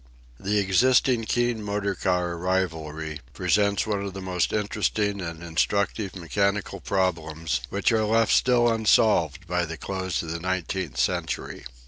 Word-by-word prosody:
The 105 +2 0
existing 120 +5 +3
keen 120 -1 0
motor 100 -1 -1
car 90 -2 0
rivalry 80 -4 -2
presents 100 -1 +1
one 105 -2 -1
of 100 -1 -6
the - - -5
most 90 -1 -1
interesting 105 -1 -1
and 85 -1 -6
instructive 100 +4 -1
mechanical 100 +3 -1
problems 80 -7 -1
which 100 +4 +1
are 110 -1 +2
left 115 +1 +3
still 120 -1 +4
unsolved 105 -7 +3
by 90 0 0
the 85 -1 -5
close 95 -3 -3
of 80 - -5
the 85 - -3
nineteenth 95 -4 -3
century. - - -2
95 Hz, 140 wpm, -25 LUFS, 85-105 Hz, -, still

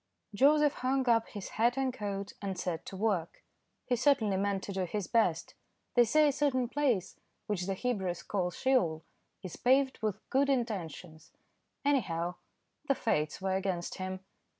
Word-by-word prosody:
Joseph 290 +5 +4
hung 260 0 +1
up 230 -1 +3
his 205 -3 -7
hat 240 +3 +1
and 265 -1 0
coat, 200 -3 -4
and 195 -2 -3
set 175 -2 -3
to 190 - -7
work. 190 -5 -1 0.4
He 250 - +1
certainly 235 -6 +3
meant 195 0 0
to - - -5
do 190 -1 -1
his 200 +2 -3
best. 185 -8 +1 0.4
They 240 -1 +6
say 305 +7 +4
a - - +4
certain 265 -3 +1
place, 250 -10 0 0.3
which 190 -3 -2
the 195 - -1
Hebrews 190 -6 -2
call 185 -3 -1
Sheol, 180 -8 +1 0.4
is 185 - -7
paved 265 +1 +3
with 215 -3 -3
good 275 +1 +3
intentions; 180 - -3 0.5
anyhow 175 -12 +1 0.5
the 275 - +3
fates 155 -6 -1
were 190 -1 +1
against 190 -2 -2
him. 185 0 -4
205 Hz, 160 wpm, -31 LUFS, 185-255 Hz, 0.5 s, They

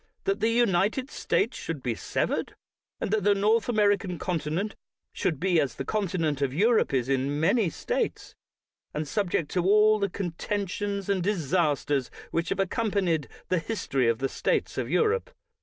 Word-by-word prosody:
— - - -45
that 390 0 0
the 225 - +2
United 230 +3 +2
States 240 - 0
should 150 -5 -5
be 120 - 0
severed, - - -2 0.4
and - - -2
that 220 -1 +1
the 205 0 +4
North 215 +4 +2
American 205 -5 +2
continent 175 +4 -2 0.4
should 155 -6 -1
be 180 -2 +3
as 140 -3 -2
the - - -5
continent 175 -9 -1
of 135 -1 0
Europe 225 +6 +3
is 130 -3 0
in 135 +2 0
many 190 +4 +3
States, - - -3 0.6
and 150 0 -2
subject 175 -3 -1
to 180 - +1
all 210 +3 +5
the 200 -1 0
contentions 200 +2 -3
and 200 -2 +1
disasters 155 -7 0 0.2
which 165 +1 -1
have 195 - -2
accompanied 195 - 0 0.2
the 185 - +2
history 145 - -1
of 115 - +1
the 135 +2 0
states - - -1
of - - -2
Europe. 460 +2 +1
185 Hz, 165 wpm, -27 LUFS, 150-210 Hz, 0.6 s, all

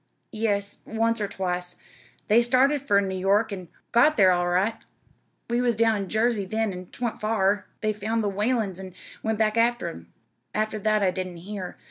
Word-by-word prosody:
"Yes, 205 -2 -1
once 225 0 0
or 205 - 0
twice. 180 -2 -2 0.5
They 225 +3 +5
started 260 +4 +3
fur 205 -7 +3
New 190 -1 -3
York, 200 +4 +2
an' 185 -3 -7 0.2
got 295 +7 +4
thar 190 -3 +6
all 175 0 +1
right. 185 +5 +2 0.7
We 235 +1 0
was 240 -2 +2
down 225 0 +3
in 195 -3 -3
Jersey 220 -1 +1
then, 220 +1 -1
an' 180 0 -8
'twa'n't 240 +3 -4
fur. 205 -2 +1 0.2
They 215 0 +1
found 220 +2 -1
the - - 0
Whalens 210 -2 0
an' 190 -1 -9 0.3
went 220 -1 -1
back 215 -1 +2
ter 235 +1 +1
them. 85 +1 -13 0.4
After 215 0 -1
that 215 0 +2
I 185 - +3
didn't 185 -2 -5
hear. 185 +1 -7
210 Hz, 185 wpm, -25 LUFS, 190-225 Hz, 0.7 s, thar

